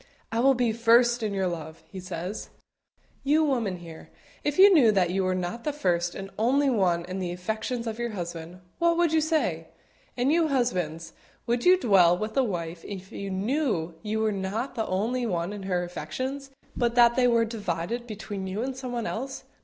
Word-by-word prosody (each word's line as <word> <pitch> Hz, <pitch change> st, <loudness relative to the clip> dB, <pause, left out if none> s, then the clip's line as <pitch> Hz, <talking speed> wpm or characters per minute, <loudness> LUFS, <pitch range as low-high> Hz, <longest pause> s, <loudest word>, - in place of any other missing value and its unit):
"I 225 Hz, -, 0 dB
will 270 Hz, +2 st, +5 dB
be 240 Hz, -2 st, +1 dB
first 235 Hz, +1 st, +4 dB
in 215 Hz, -2 st, -1 dB
your 195 Hz, -1 st, 0 dB
love," 160 Hz, -3 st, -5 dB
He 190 Hz, -, -7 dB
says. 180 Hz, +2 st, -5 dB, 0.7 s
You 300 Hz, +3 st, +3 dB
women 235 Hz, -11 st, 0 dB
here, 165 Hz, -2 st, -11 dB, 0.3 s
if 295 Hz, -1 st, -1 dB
you 390 Hz, +1 st, +8 dB
knew 255 Hz, -10 st, +6 dB
that 185 Hz, -4 st, +2 dB
you 190 Hz, +1 st, 0 dB
were 185 Hz, 0 st, +1 dB
not 185 Hz, +6 st, -4 dB
the 300 Hz, -, 0 dB
first 175 Hz, -11 st, 0 dB
and 195 Hz, 0 st, -7 dB
only 270 Hz, +5 st, +3 dB
one 180 Hz, -6 st, +1 dB
in 185 Hz, +1 st, -5 dB
the 180 Hz, -2 st, -2 dB
affections 220 Hz, +6 st, -3 dB
of 225 Hz, 0 st, -4 dB
your 240 Hz, 0 st, -1 dB
husband, 175 Hz, -3 st, -6 dB, 0.2 s
what 335 Hz, 0 st, +3 dB
would 345 Hz, -2 st, +2 dB
you 320 Hz, -, +4 dB
say? 315 Hz, 0 st, 0 dB, 0.5 s
And 255 Hz, +4 st, +2 dB
you 330 Hz, -1 st, +3 dB
husbands, 180 Hz, -, -1 dB, 0.3 s
would 240 Hz, 0 st, 0 dB
you 365 Hz, +1 st, +7 dB
dwell 180 Hz, -, +5 dB
with 215 Hz, +3 st, -4 dB
a 270 Hz, -, +4 dB
wife 170 Hz, -6 st, -4 dB
if 190 Hz, -1 st, -8 dB
you 200 Hz, 0 st, -5 dB
knew 195 Hz, -, -1 dB
you 215 Hz, +2 st, -2 dB
were 220 Hz, -1 st, +2 dB
not 200 Hz, +6 st, -3 dB
the 225 Hz, -3 st, -2 dB
only 235 Hz, +6 st, -1 dB
one 175 Hz, -1 st, -2 dB
in 205 Hz, -, -7 dB
her 180 Hz, -1 st, +1 dB
affections, 255 Hz, -, -5 dB, 0.3 s
but 240 Hz, -1 st, 0 dB
that 235 Hz, -1 st, +6 dB
they 250 Hz, -1 st, +4 dB
were 230 Hz, -1 st, +3 dB
divided 220 Hz, +1 st, -3 dB
between 205 Hz, -3 st, -6 dB
you 200 Hz, +5 st, -3 dB
and 265 Hz, 0 st, -3 dB
someone 245 Hz, -3 st, -4 dB
else? 265 Hz, +4 st, -4 dB
220 Hz, 200 wpm, -27 LUFS, 180-250 Hz, 0.7 s, you